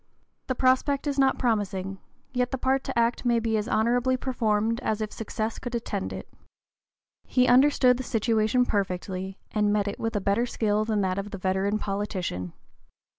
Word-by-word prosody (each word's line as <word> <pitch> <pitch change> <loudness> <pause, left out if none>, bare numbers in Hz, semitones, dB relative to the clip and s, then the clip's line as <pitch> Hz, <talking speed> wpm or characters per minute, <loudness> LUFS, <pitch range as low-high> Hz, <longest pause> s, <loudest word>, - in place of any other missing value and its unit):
The 260 - -1
prospect 260 +3 +2
is 285 -1 -1
not 270 -1 +3
promising; 195 -5 -1 0.3
yet 250 -1 +1
the 265 - -2
part 265 +1 +1
to - - -4
act 235 +1 +1
may 240 -1 +3
be 225 -1 0
as 210 -1 -1
honorably 245 +3 +2
performed 230 -3 0
as 220 -5 -1
if 215 -1 -3
success 220 0 -4
could 245 -1 -5
attend 210 -4 -3
it." - - -7 1.0
He 250 -1 +3
understood 255 -1 +5
the 260 - -4
situation 225 +1 +1
perfectly 190 -2 -2
and 210 -1 +1
met 205 -1 +1
it 200 - -4
with 225 -1 -2
a - - +2
better 200 +5 +1
skill 215 -2 0
than 215 -2 0
that 190 0 0
of 200 +1 -5
the 200 - -6
veteran 190 +2 0
politician. 195 - -3
220 Hz, 175 wpm, -26 LUFS, 200-250 Hz, 1.0 s, understood